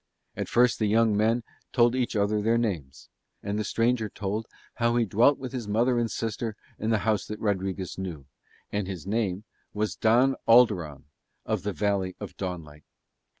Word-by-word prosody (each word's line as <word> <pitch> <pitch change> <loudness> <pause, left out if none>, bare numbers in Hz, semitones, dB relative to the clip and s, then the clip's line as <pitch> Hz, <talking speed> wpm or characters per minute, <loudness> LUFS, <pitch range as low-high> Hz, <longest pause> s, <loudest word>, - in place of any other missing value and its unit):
And - - -4
first 120 0 +3
the 110 - +2
young 110 0 +3
men 115 +3 +2 0.3
told 120 -1 +4
each 125 -2 -1
other 105 0 +1
their 115 +2 +2
names; 75 - -3 0.4
and 100 +1 -2
the - - 0
stranger 115 0 +1
told 105 +3 -3 0.3
how 120 0 +3
he 120 -1 +3
dwelt 115 +8 +4
with 130 -2 -6
his 125 -5 -5
mother 120 +4 +2
and 115 -1 0
sister 110 0 -3 0.2
in 110 - -1
the 110 - +3
house 110 -2 +1
that 105 0 -6
Rodriguez 95 -3 -2
knew, 85 -7 -5 0.5
and 100 -2 -2
his 90 -5 -6
name 100 -2 -1 0.3
was 105 0 -1
Don 125 +4 +3
Alderon 95 - +4 0.4
of - - -1
the 105 - -2
Valley 100 -2 -1
of - - -8
Dawnlight. 85 -6 -6
105 Hz, 175 wpm, -27 LUFS, 95-115 Hz, 0.5 s, told